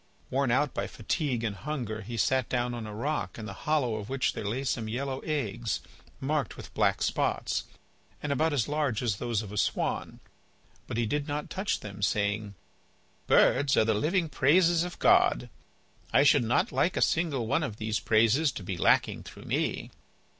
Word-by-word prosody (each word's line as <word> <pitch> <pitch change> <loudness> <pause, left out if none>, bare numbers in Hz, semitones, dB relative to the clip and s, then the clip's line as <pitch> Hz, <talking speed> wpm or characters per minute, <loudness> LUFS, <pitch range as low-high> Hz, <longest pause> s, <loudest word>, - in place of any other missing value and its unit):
Worn 135 0 +1
out 135 +3 +1
with - - -2
fatigue 125 +1 -2
and 110 -3 -2
hunger, 120 -7 -4
he 115 +3 -6
sat 130 +3 +1
down 125 -1 0
on 115 -2 -5
a - - -7
rock 115 - -2
in 110 - -6
the - - -6 0.2
hollow 130 -8 +2
of 105 0 -7
which 135 0 0
there - - -5
lay 125 +6 -2
some 115 -4 -2
yellow 130 +3 -3
eggs, 120 - -2 0.4
marked 140 - -1
with - - -10
black - - +2
spots, - - 0 0.5
and 150 - -3
about 155 +4 +2
as 140 -6 0
large 145 -6 0
as 110 -5 0
those 115 -2 -1
of 100 - -9
a 105 - -2
swan. - - -1 0.7
But - - -4
he 120 - +1
did 145 +6 -1
not 145 0 -4
touch 195 +2 -1
them, 105 -1 -8
saying: 105 +2 0 0.7
"Birds 135 +1 +4
are 110 - +5
the 110 - +2
living 165 - +1
praises 165 +4 +3
of 180 0 -6
God. - - +3 0.6
I 140 - +5
should 145 -2 +5
not 130 - +1
like 175 - +1
a - - +1
single 155 -8 +1
one 115 - +1
of 125 -9 -4
these 110 0 -1
praises 115 +7 +3
to 100 - -7
be 95 -1 -4
lacking - - +3
through - - -12
me." - - -1
125 Hz, 190 wpm, -29 LUFS, 110-150 Hz, 0.7 s, are